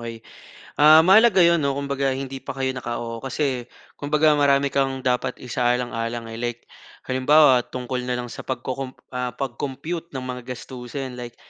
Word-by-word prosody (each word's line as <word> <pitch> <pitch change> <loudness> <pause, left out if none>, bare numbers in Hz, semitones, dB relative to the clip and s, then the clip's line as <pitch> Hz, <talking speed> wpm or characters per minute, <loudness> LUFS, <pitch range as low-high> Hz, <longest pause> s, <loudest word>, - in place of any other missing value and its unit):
okey. 115 -1 -8 0.6
Ah, 155 +2 +8
mahalaga 195 0 +6
'yon 170 -1 +4
'no, 140 -2 0
kumbaga 140 -1 -1
hindi 135 0 -5
pa 135 0 -7
kayo 130 -1 -1
naka-oo 120 -2 -5
kasi 130 -1 -2 0.3
kumbaga 150 +1 +3
marami 140 -1 +3
kang 135 -1 0
dapat 125 0 0
isaalang-alang. 120 -2 -2
Like, 120 0 -4 0.4
halimbawa 130 -1 +4
tungkol 125 0 -4
na 125 - 0
lang 120 -1 -5
sa - - -9
pag-co-comp 130 +1 -4 0.2
ah, 125 -1 -3
pag-compute 140 +5 -5
ng 130 - -4
mga 125 -1 -6
gastusin, 125 +1 -7
like 120 -1 -8
130 Hz, 150 wpm, -23 LUFS, 125-140 Hz, 0.6 s, Ah